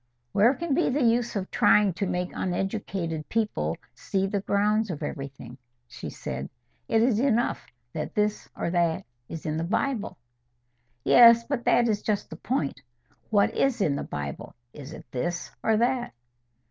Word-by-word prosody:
"Where 230 - +4
can 340 -1 -2
be 345 - +2
the 270 +2 +1
use 235 0 +2
of 190 -2 -3
trying 210 -3 +4
to 195 +3 -2
make 180 0 -2
uneducated 180 -4 -3
people 220 -2 -1 0.2
see 195 -1 -1
the 200 0 -1
grounds 210 +2 +1
of 160 -5 -4
everything?" 135 -2 -7 0.3
she - - -8
said. 65 +1 -6 0.4
"It 225 0 +3
is 235 -3 +2
enough 240 -2 +1 0.3
that 155 - -5
this 210 0 0
or 170 - -2
that 170 -2 +1 0.2
is 165 - -7
in 155 0 -1
the 160 - -1
Bible." 220 +5 -1 0.9
"Yes; 235 -1 +8
but 250 -1 -3
there 240 - +4
is 210 -2 0
just 205 -2 -2
the - - -6
point. 140 - -2 0.5
What 205 -2 +3
is 270 -3 +1
in 155 -8 +2
the - - -3
Bible? 70 -1 -6 0.2
Is 145 0 -9
it - - -10
this 175 +7 -3
or 220 -1 +2
that?" 240 - 0
205 Hz, 165 wpm, -26 LUFS, 165-235 Hz, 0.9 s, Yes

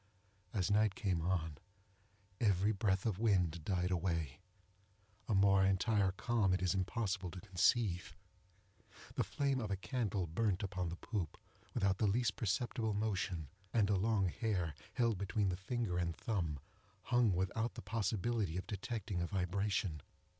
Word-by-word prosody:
As 100 -1 0
night 105 -1 +3
came 95 -8 0
on, 80 -4 -1 0.8
every 100 -1 +3
breath 95 -1 +1
of 105 -4 0
wind 90 -7 +2
died 90 +1 0
away, 85 -5 -1 0.9
an 105 - +3
more 95 0 +5
entire 95 +1 +3
calm 105 -3 +2
it 95 - -3
is 95 - +2
impossible 95 0 -1
to 90 - -8
conceive. 95 0 +1 1.0
The - - +1
flame 140 -2 0
of 110 -4 -3
a 100 - +1
candle 105 -4 -1
burned 95 +4 0
upon 95 -3 -2
the 85 - -4
poop 90 -4 -4 0.4
without 95 -1 +2
the 110 - +3
least 115 +3 +1
perceptible 115 0 -1
motion, 95 -7 -1 0.3
and 105 -3 +4
a - - +4
long 100 0 +2
hair, 90 -6 -1 0.2
held 115 -5 +1
between 100 0 0
the 90 - 0
finger 95 -1 -2
and 85 -2 -1
thumb, 85 -10 -2 0.5
hung 120 -3 +3
without 95 +6 -1
the - - -7
possibility 110 -3 -1
of 95 - -3
detecting 105 -3 -3
a 85 - 0
vibration. 95 -3 -1
100 Hz, 150 wpm, -36 LUFS, 90-110 Hz, 1.0 s, more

